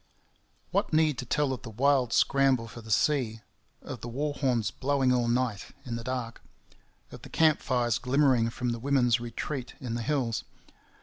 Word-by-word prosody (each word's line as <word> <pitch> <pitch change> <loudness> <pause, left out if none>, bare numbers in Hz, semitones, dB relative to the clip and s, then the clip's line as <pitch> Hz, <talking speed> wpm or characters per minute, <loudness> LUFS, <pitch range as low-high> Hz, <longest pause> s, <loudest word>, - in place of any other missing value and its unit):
What - - 0
need 155 -3 +3
to 125 - -4
tell 145 +1 +1
of 130 - -6
the 125 - -8
wild 130 +1 +2
scramble 135 -4 +3
for 115 +2 -10
the 110 - -13
sea; 115 -1 +1 0.4
of 125 - -7
the - - -6
war 145 +5 -2
horns 120 -7 0
blowing 135 0 +1
all 120 -1 +1
night 120 -4 -1
in 120 -2 -4
the 115 - -5
dark; 125 -2 -4 0.7
of - - -10
the - - -11
camp 160 -2 +3
fires 120 -3 0
glimmering 130 -3 +3
from 125 +1 -3
the 120 -1 -2
women's 125 -2 +2
retreat 120 +2 -5
in 125 -3 -5
the 120 - -2
hills? 125 -3 -1
125 Hz, 180 wpm, -28 LUFS, 115-140 Hz, 0.7 s, need